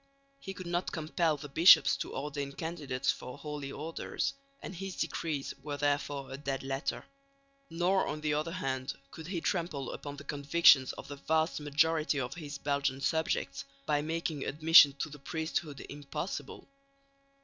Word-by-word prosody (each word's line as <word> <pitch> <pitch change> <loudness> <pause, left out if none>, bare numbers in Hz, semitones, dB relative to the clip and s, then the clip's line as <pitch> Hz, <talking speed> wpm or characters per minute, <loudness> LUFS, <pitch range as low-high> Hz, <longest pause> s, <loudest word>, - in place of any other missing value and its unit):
He 195 -5 -7
could 185 - -7
not 175 +1 -1
compel 160 0 0
the 145 - -8
bishops 165 +6 +7
to - - -5
ordain 140 -1 -4
candidates 150 -5 -1
for 125 - -8
Holy 150 -2 -5
Orders, 160 +3 -3 0.3
and - - -7
his 195 +1 -6
decrees 150 -4 -2
were 145 0 -4
therefore 145 -1 -1
a 135 - -5
dead 135 -2 -3
letter; 135 +1 -3 0.6
nor 180 +3 +2
on 155 +1 -4
the 150 -1 0
other 155 +3 -1
hand 135 -6 -2 0.2
could 160 0 -9
he 180 -2 -2
trample 165 -8 -1
upon 145 -1 -6
the 145 - -9
convictions 145 -1 +5
of - - -9
the 145 0 -7
vast 160 +3 +1
majority 150 +1 +2
of 125 0 -3
his 145 -4 -7
Belgian 140 -1 0
subjects 140 -1 -1 0.2
by 145 -1 +2
making 160 -1 -2
admission 155 -1 +7
to - - -1
the 150 0 -11
priesthood 160 0 -3
impossible. 145 +6 -6
150 Hz, 160 wpm, -31 LUFS, 140-165 Hz, 0.6 s, bishops